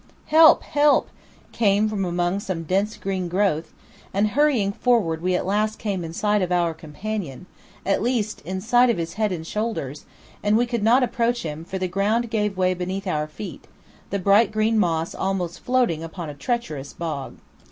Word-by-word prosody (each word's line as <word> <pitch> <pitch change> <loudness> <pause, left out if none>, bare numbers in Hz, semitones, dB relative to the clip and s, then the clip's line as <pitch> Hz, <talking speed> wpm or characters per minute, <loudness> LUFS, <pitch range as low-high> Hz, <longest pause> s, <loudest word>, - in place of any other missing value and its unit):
"Help, 315 +1 +7
help!" 290 0 +3 0.4
came 210 -1 +2
from 210 -2 -2
among 175 +2 0
some 185 -4 -4
dense 195 +6 0
green 190 -2 -3
growth, 175 -3 0 0.4
and 205 +2 +2
hurrying 260 -6 +2
forward 200 -8 +1
we 185 +1 +1
at - - -1
last 215 +3 0
came 200 -5 -3
in 165 - -6
sight 210 +4 +1
of 180 -1 -1
our 175 -2 +2
companion, 160 0 -6 0.4
at 195 - +1
least 230 -2 -1
in 185 +4 -4
sight 245 +5 +4
of 235 - +1
his 165 0 -3
head 215 0 0
and 165 -3 -4
shoulders, 210 - -4 0.3
and 210 +1 +3
we 240 - +3
could 235 -2 -2
not 240 +5 +4
approach 240 0 0
him, 155 0 -5
for 190 +3 -5
the 185 0 -1
ground 210 +6 0
gave 210 -3 0
way 185 0 +2
beneath 185 +2 -4
our 150 -5 -1
feet, 175 +7 -9 0.4
the 200 - -1
bright 200 +3 +4
green 215 +1 +2
moss 165 -3 0
almost 185 -3 -2
floating 245 -11 +1
upon 165 -1 -6
a - - -9
treacherous 150 - -3
bog. 155 -5 -5
195 Hz, 185 wpm, -23 LUFS, 170-220 Hz, 0.4 s, Help